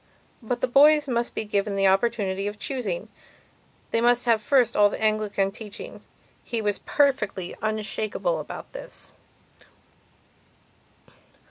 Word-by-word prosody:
But 240 +1 -3
the - - +2
boys 295 +3 +5
must 240 -2 -1
be - - -2
given 200 -1 -1
the 195 0 +2
opportunity 195 -1 +1
of 205 0 -5
choosingand 215 -6 -4 0.8
they 230 - +1
must 245 +1 +3
have 230 -2 +3
first 255 +1 +2
of - - +3
all 205 - +7
the - - -6
Anglican 215 -2 +1
teaching. 210 0 -9 0.4
He 235 - -3
was 205 -2 -1
perfectly 210 -11 0
unshakable 215 - -2
about - - -8
this. - - -10
215 Hz, 130 wpm, -25 LUFS, 205-245 Hz, 0.8 s, all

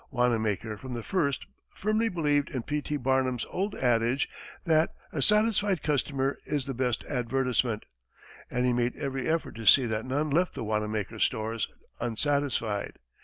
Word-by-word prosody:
Wanamaker 110 -4 0
from 130 -2 -6
the 115 - -4
first 140 - 0 0.3
firmly 215 +2 +1
believed 150 -6 +1
in 130 -3 -3
P. 150 +3 -1
T. 150 +1 -2
Barnum's 130 -2 +1
old 200 +3 -1
adage 120 +1 +2 0.4
that 160 -1 +3 0.2
"A 145 - -1
satisfied 210 -2 +3
customer 140 -2 0
is 145 -3 -1
the 135 - -3
best 125 -2 0
advertisement," 125 -3 0 0.6
and 125 +1 0
he 125 - +3
made 120 0 +1
every 135 -3 -3
effort 165 0 0
to 115 -2 -6
see 130 +3 +8
that 110 0 -2
none 145 +4 -1
left 175 +5 +2
the - - -4
Wanamaker 105 0 -2
stores 110 -1 0 0.3
unsatisfied. 120 -3 0
130 Hz, 155 wpm, -28 LUFS, 115-150 Hz, 0.6 s, see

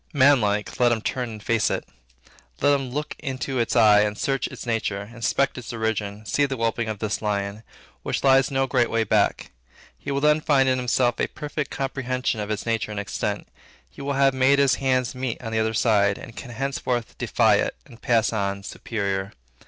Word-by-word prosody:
Manlike 125 -8 +3
let 120 -1 +4
him 115 -2 0
turn 125 +1 -2
and 110 -2 -9
face 115 -2 +2
it. - - -3 0.7
Let 145 - +4
him 135 -2 -1
look 150 +4 -4
into 130 -2 -3
its 115 - 0
eye 105 -3 +6
and 105 0 -1
search 135 -1 -1
its - - -9
nature, 110 -4 -1
inspect 125 +3 0
its 120 - -8
origin, 110 -2 -3
see 140 +10 +1
the 135 -1 -4
whelping 115 0 -1
of 110 - -3
this 105 +1 -2
lion, 100 0 -2 0.4
which - - -3
lies 135 -1 +5
no 135 -1 +1
great 125 -2 +1
way 115 0 +1
back; 110 - +1 0.5
he - - -7
will 140 0 0
then 150 +1 +3
find 135 -3 +3
in 130 0 +2
himself 125 0 +1
a - - +1
perfect 150 -1 -5
comprehension 130 -3 -2
of 105 0 -4
its 105 -1 -3
nature 115 -2 -1
and 105 -1 -4
extent; 100 - -3 0.4
he - - -11
will 140 +1 -2
have 135 -1 +3
made 130 +2 +4
his 140 -2 +4
hands 130 -2 +1
meet 130 -2 -3
on 115 -2 -6
the 110 - 0
other 110 0 0
side, 100 -3 +3
and 115 - -11
can - - -8
henceforth 125 -1 -3
defy - - +3
it, - - -1
and 115 - -16
pass 115 -2 +2
on 100 -2 -2
superior. 100 -2 -3
120 Hz, 200 wpm, -24 LUFS, 110-135 Hz, 0.7 s, eye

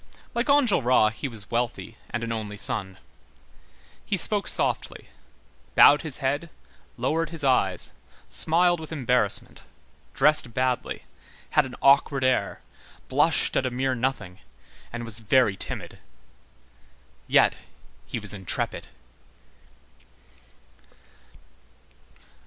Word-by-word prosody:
Like 235 +3 -1
Enjolras, 135 - +3
he 125 - -5
was 110 -4 -11
wealthy 120 0 -2
and 120 0 -4
an 115 - -3
only 105 -2 -5
son. 95 -2 -2 1.1
He - - -1
spoke - - 0
softly, - - 0 0.7
bowed 145 +1 +7
his 155 -5 -3
head, 145 +4 -2 0.5
lowered 165 +1 -1
his 165 -3 -7
eyes, 100 -9 +1 0.4
smiled 175 +2 +2
with 160 -1 -9
embarrassment, 125 -8 -1 0.5
dressed 135 -4 +4
badly, 130 -1 -1 0.5
had 150 -3 +3
an 125 - -10
awkward 140 0 +4
air, 130 -6 0 0.5
blushed - - +2
at 130 - +1
a - - -1
mere 130 +2 -1
nothing, 115 -7 -3 0.5
and 120 0 -5
was 115 -1 -3
very 110 -1 +3
timid. - - -5 1.3
Yet - - +3 0.5
he - - -4
was - - -6
intrepid. 95 -3 -4
130 Hz, 105 wpm, -25 LUFS, 110-145 Hz, 1.3 s, bowed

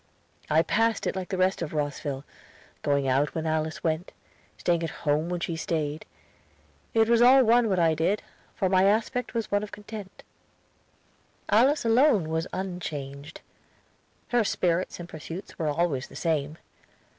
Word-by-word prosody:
I 160 +2 +4
passed 225 +3 +1
it - - -1
like 185 -1 -4
the 190 - -2
rest 185 0 +1
of 165 -2 -4
Rosville, 145 -2 -3 0.6
going 140 -1 +1
out 135 +3 +1
when 160 -1 -2
Alice 160 0 -1
went, 160 +1 -1 0.4
staying 170 -1 +1
at 165 - -2 0.2
home 150 +3 +1
when 175 0 -2
she 170 - -2
stayed. 155 -2 -3 0.9
It 225 -1 +5
was 235 0 +4
all 260 +2 +7
one 235 0 +4
what 190 - +1
I 165 -2 +4
did, 165 +7 0 0.3
for 190 - +1
my 185 0 +4
aspect 225 +4 0
was 230 -2 -2
one 205 0 +2
of 210 - -7
content. 210 -2 -9 1.3
Alice 255 +6 +4
alone 225 - +4
was 160 +2 -1
unchanged; 155 -6 -6 0.9
her 240 -2 +3
spirits 180 -3 0
and 175 - -7
pursuits 165 +4 -9
were 160 - 0
always 145 -3 0
the - - -15
same. 155 -2 -1
175 Hz, 155 wpm, -27 LUFS, 155-210 Hz, 1.3 s, all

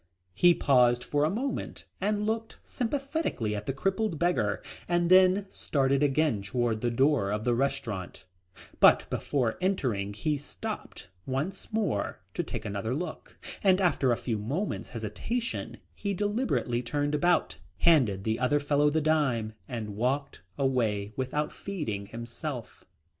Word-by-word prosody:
He 175 - +5
paused 125 -4 +4
for 145 0 0
a 155 - +3
moment 250 +7 -3 0.2
and 210 +1 0
looked 225 +1 -2
sympathetically 270 - -2
at 105 0 -5
the - - +1
crippled 195 +5 -1
beggar 145 - +1 0.2
and 175 0 +1
then 185 +1 +6
started 135 -1 +1
again 145 -5 +2
toward 115 +2 -1
the 120 - +1
door 130 -3 +2
of 105 +1 -1
the 120 - +3
restaurant, 110 -8 -2 0.5
but - - +6
before 125 -6 -1
entering 125 - 0
he 150 +8 -1
stopped 205 - -7 0.2
once 145 +9 -3
more 200 - -1
to - - -1
take - - -5
another 105 +4 -2
look, 165 +1 -6 0.3
and 190 -1 +5
after 165 -8 +2
a 120 - +2
few 115 -4 -2
moments' 145 - -3
hesitation 130 - -3 0.2
he 200 -1 -3
deliberately 205 - 0
turned 145 +4 -1
about, 160 - +2 0.2
handed 125 - +4
the 110 +1 0
other 125 +4 +2
fellow 145 0 +3
the 155 +2 +1
dime 140 -8 +1
and 110 -5 -5
walked 135 +4 -1 0.2
away 110 -6 0
without 135 +3 -1
feeding 115 - -4
himself. 120 +3 -6
140 Hz, 140 wpm, -29 LUFS, 115-180 Hz, 0.5 s, then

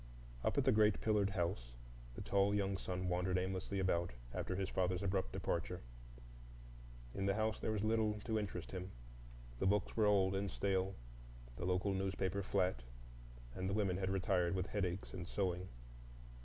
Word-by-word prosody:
Up - - +1
at - - +3
the - - +6
great 105 -1 +4
pillared 105 -2 +2
house 85 - -2 0.4
the - - -5
tall 100 +1 +3
young 100 -1 +1
son 95 -1 -3
wandered 90 +1 +1
aimlessly 95 +1 -2
about 90 -4 +1 0.2
after 95 - -2
his 95 0 -1
father's 90 0 0
abrupt 95 -1 0
departure. 90 -1 -2 1.3
In 95 0 -1
the 100 - +3
house 110 0 0
there - - -2
was 105 -2 0
little 110 -1 +2
to 110 -2 +1
interest 95 -4 -4
him; 95 0 -4 0.7
the - - +2
books 100 0 +2
were 110 -2 +4
old 95 -2 +4
and 100 0 0
stale, 95 0 0 0.6
the 85 - -4
local 95 +2 +1
newspaper 95 0 0
flat, 95 -8 +1 0.7
and 95 +5 -2
the 100 - 0
women 95 -4 +1
had 95 -1 0
retired 95 -2 +2
with 95 -1 0
headaches 95 -2 -2
and 90 -2 -5
sewing. 90 -2 -1
95 Hz, 170 wpm, -38 LUFS, 90-100 Hz, 1.3 s, the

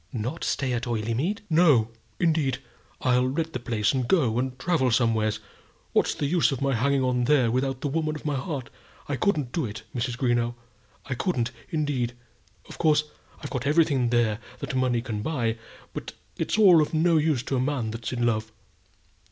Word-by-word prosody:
"Not 125 +6 -4
stay 130 -2 0
at 120 +1 -2
Oileymead?" 120 - -1
"No, 155 -9 +4 0.3
indeed. 155 -6 +2 0.4
I'll 125 0 +3
let 160 +4 -2
the 125 - -2
place, 115 -2 0
and 130 -3 -1
go 125 -9 +2
and 130 0 -2
travel 155 -3 +1
somewheres. 110 -3 +1 0.5
What's - - +2
the 145 - -2
use 165 +2 +3
of 135 - -2
my 140 -1 +1
hanging 135 +3 +2
on 125 -1 +1
there 130 -4 +3
without 130 +1 -1
the - - -1
woman 155 +1 -1
of 155 - -9
my 150 - 0
heart? 135 -1 -4 0.4
I 145 - -1
couldn't 145 -6 0
do 165 - -1
it, 110 +1 -8
Mrs. 120 0 -2
Greenow; 120 -2 +1 0.5
I 135 - -3
couldn't, 125 -4 -1 0.2
indeed. 145 -6 -1 0.5
Of - - -11
course 150 -2 +2 0.3
I've 145 - -6
got 130 +1 -2
everything 145 -5 +3
there 115 -3 +2 0.2
that - - -5
money 125 -3 +1
can 110 -4 -4
buy, 115 -5 -1 0.3
but - - -6 0.2
it's - - -1
all 185 -7 +7
of 150 - -1
no 165 +1 +4
use 150 -5 +1
to 135 - -2
a - - +1
man 130 -4 -1
that's 115 0 -5
in 120 -1 -1
love. 110 -1 0
130 Hz, 185 wpm, -26 LUFS, 120-150 Hz, 0.5 s, all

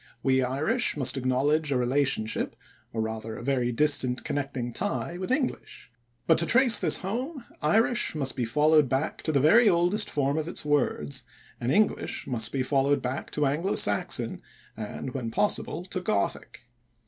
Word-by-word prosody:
We 130 -1 +3
Irish 150 - 0
must 135 -1 +2
acknowledge 140 +4 +1
a 135 - +2
relationship, 125 -3 -1 0.4
or 110 - -2
rather 110 0 -5
a - - -8
very 125 -2 0
distant 130 -1 +1
connecting 140 -4 -3
tie, 180 - -3
with 185 - -4
English. 260 - -3 0.3
But, 165 - +4
to 170 - 0
trace 245 -1 +5
this - - +3
home, 250 - -4 0.2
Irish 220 +7 +2
must 135 -3 -1
be 125 - -2
followed 150 +4 +3
back 135 +5 -2
to 155 - -1
the 140 - +2
very 210 - +5
oldest 180 +4 +3
form 140 +1 0
of 155 - -4
its 170 - -3
words, 130 - 0 0.4
and 120 - -1
English 210 +4 0
must 115 -2 -2
be 135 -2 -1
followed 140 +1 +1
back 130 +2 -4
to 150 - +1
Anglo 155 +8 0
Saxon 105 0 +1 0.3
and 110 +4 -6
when 125 -4 -4
possible 180 - -1
to 185 -1 -5
Gothic. 100 - -2
140 Hz, 165 wpm, -27 LUFS, 125-170 Hz, 0.4 s, trace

